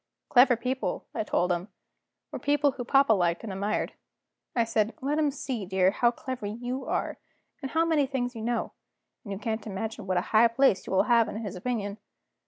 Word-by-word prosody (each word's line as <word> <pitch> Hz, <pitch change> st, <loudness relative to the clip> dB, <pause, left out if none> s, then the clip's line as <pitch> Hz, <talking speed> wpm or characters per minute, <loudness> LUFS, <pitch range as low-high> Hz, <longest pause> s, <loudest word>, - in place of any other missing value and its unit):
Clever 250 Hz, 0 st, +6 dB
people, 255 Hz, +3 st, -3 dB
I 225 Hz, -, -1 dB
told 180 Hz, -3 st, +1 dB
him, 175 Hz, +2 st, -1 dB, 0.6 s
were -, -, -5 dB
people 290 Hz, 0 st, +2 dB
whom 250 Hz, -2 st, -7 dB
papa 275 Hz, -4 st, +5 dB
liked 175 Hz, -4 st, +1 dB
and 210 Hz, -4 st, -5 dB
admired. 200 Hz, +3 st, -1 dB, 0.6 s
I 235 Hz, -, +4 dB
said: 225 Hz, -1 st, 0 dB
"Let 290 Hz, +2 st, 0 dB
him 300 Hz, -2 st, +3 dB
see, 265 Hz, -5 st, -4 dB
dear, 190 Hz, 0 st, +2 dB
how 240 Hz, +3 st, +3 dB
clever 245 Hz, -2 st, -5 dB
you 245 Hz, +5 st, -4 dB
are, -, -, -2 dB, 0.4 s
and 270 Hz, -, -4 dB
how 325 Hz, +3 st, +2 dB
many 310 Hz, -4 st, +2 dB
things 250 Hz, -2 st, -2 dB
you 225 Hz, -, -6 dB
know 235 Hz, +1 st, -1 dB, 0.5 s
and 205 Hz, -, -8 dB
you 195 Hz, -, -3 dB
can't 220 Hz, +2 st, -3 dB
imagine 215 Hz, +1 st, -5 dB
what 185 Hz, -1 st, +1 dB
a -, -, +3 dB
high 220 Hz, +2 st, +7 dB
place 230 Hz, -3 st, +2 dB
you -, -, -5 dB
will 190 Hz, -, +4 dB
have 235 Hz, -2 st, +3 dB
in -, -, -6 dB
his 200 Hz, -2 st, -5 dB
opinion. 205 Hz, 0 st, -3 dB
230 Hz, 200 wpm, -28 LUFS, 205-260 Hz, 0.6 s, high